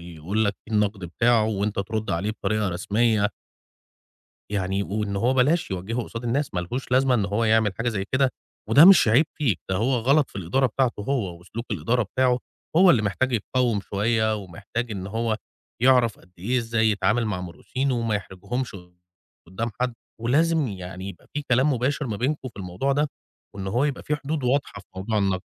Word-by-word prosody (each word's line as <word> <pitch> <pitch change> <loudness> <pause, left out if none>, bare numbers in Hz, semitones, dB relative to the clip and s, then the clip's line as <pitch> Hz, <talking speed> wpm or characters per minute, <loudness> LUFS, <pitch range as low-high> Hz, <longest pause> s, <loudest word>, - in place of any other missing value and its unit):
يقول 85 +5 -2
لك 105 -1 0
إيه 110 - -3
النَقْد 105 -2 +1
بتاعه 115 +6 +2
وأنت 105 -1 -1
ترُد 110 +2 -2
عليه 95 +6 -1
بطريقة 110 -1 -1
رسمية. 105 +4 +1 1.2
يعني 95 -1 -1
وإن 100 +1 -2
هو 120 +6 +2
بلاش 145 +5 +2
يوجّهه 100 +6 -2
قصاد 115 +1 -7
الناس، 135 +2 -1
ما 90 - 0
لهوش 125 +11 -5
لازمة 130 0 +4
إن 105 -5 +2
هو 105 +3 0
يعمل 110 -3 +3
حاجة 120 +1 -1
زي 100 -4 -2
كده 130 0 +3 0.4
وده 150 +4 +8
مش 185 - +8
عيب 130 +8 +5
فيك، 135 - 0
ده 95 - +1
هو 120 +7 +1
غلط 135 +5 +3
في - - -11
الإدارة 100 +9 +1
بتاعته 125 -2 0
هو 100 -9 -2
وسلوك 115 +7 -7
الإدارة 110 +6 +1
بتاعه، 125 +4 +1 0.4
هو 185 +1 +7
اللي 120 -9 +4
محتاج 125 +6 0
يتقوّم 120 -1 0
شوية 110 +2 0
ومحتاج 100 +5 -5
إن 95 -3 -4
هو 110 +2 -1 0.5
يعرف 125 -4 +4
قدّ 90 - -22
إيه 120 +8 0
إزاي 115 -1 +1
يتعامل 110 +3 +1
مع 100 -4 -2
مرؤوسينه 130 +9 -3
وما 115 -2 0
يحرجهمش 105 +5 -4 0.7
قُدّام 115 +6 -3
حد 125 -1 0 0.3
ولازم 150 +5 +2
يعني 95 -1 -7
يبقى - - -11
فيه 150 - -2
كلام 130 +4 +4
مباشر 135 +4 -1
ما 110 -4 -3
بينكم 130 +3 -1
في 115 - -19
الموضوع 90 +10 -1
ده 150 +1 +1 0.5
وإن 95 -1 -5
هو 120 +8 +1
يبقى 145 -3 -2
فيه 150 - -1
حدود 145 -1 -3
واضحة 130 -4 0
في 95 - -23
موضوع 105 +3 -1
النَقْد. 95 -2 0
110 Hz, 185 wpm, -24 LUFS, 100-130 Hz, 1.2 s, وده